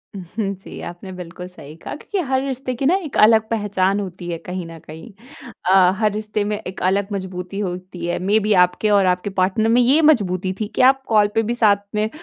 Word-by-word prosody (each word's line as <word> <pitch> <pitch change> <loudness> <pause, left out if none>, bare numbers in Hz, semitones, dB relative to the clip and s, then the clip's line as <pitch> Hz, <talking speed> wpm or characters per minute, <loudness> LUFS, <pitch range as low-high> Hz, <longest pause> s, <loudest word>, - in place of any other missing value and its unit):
उहुँ, 195 +2 -4
जी। 190 - -11
आपने 175 +2 -8
बिल्कुल 180 0 -8
सही 155 -5 -13
कहा 165 - -8
क्योंकि 390 +6 -4
हर 260 0 +1
रिश्ते 260 -1 -3
की 270 - -3
न 290 - +4
एक 300 - -5
अलग 220 0 +5
पहचान 205 -3 0
होती 185 -3 -6
है 170 - -3
कहीं 180 -1 -5
न 165 0 -10
कहीं। 160 +9 -11 0.6
अ, 185 -1 +6
हर 215 -1 +2
रिश्ते 215 0 -3
में 210 0 -2
एक 185 - -8
अलग 195 +2 +1
मज़बूती 185 0 -5
होती 180 -2 -5
है। 175 - -2
मेबी 210 +3 +2
आपके 180 +4 -3
और 200 -2 +4
आपके 180 +2 0
पार्टनर 190 +3 +1
में 240 +2 +4
ये 270 +6 +4
मज़बूती 190 - +2
थी 215 - -1
कि - - +2
आप 270 0 -12
कॉल 210 -2 +4
पे 225 - +4
भी 230 +2 -1
साथ 205 -4 +3
में 215 +1 0
200 Hz, 215 wpm, -20 LUFS, 185-220 Hz, 0.6 s, अ